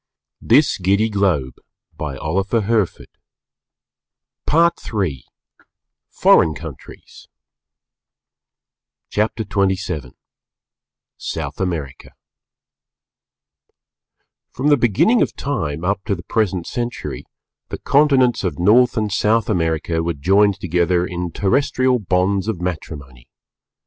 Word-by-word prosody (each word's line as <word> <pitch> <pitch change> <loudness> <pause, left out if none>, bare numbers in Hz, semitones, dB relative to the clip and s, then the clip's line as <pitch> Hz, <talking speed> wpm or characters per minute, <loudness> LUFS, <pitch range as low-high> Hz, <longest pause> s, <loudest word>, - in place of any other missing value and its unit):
"_ 100 - +2 2.9
PART 170 -3 +1
III 85 - -2 0.9
FOREIGN 80 - +4
COUNTRIES 80 -5 -11 1.8
CHAPTER 110 +1 -1
XXVII 95 - -2 1.0
SOUTH - - -5
AMERICA 80 -8 -4 2.4
From 135 +4 -1
the 145 - +6
beginning 125 - +2
of - - 0
time 80 - -3
up 100 +1 -1
to 105 -3 0
the 85 - -10
present 95 -3 -1
century, 120 0 -5 0.5
the - - -5
continents 135 -5 +3
of 90 -7 -2
North 120 +8 +4
and 105 -2 -1
South 110 +3 +1
America 80 -2 -1
were 85 +1 -1
joined 100 +7 +2
together 90 0 +1
in 90 -1 -4
terrestrial 130 - +1
bonds 95 +1 0
of 110 -6 -2
matrimony. 70 -8 -6
95 Hz, 85 wpm, -19 LUFS, 85-115 Hz, 2.9 s, the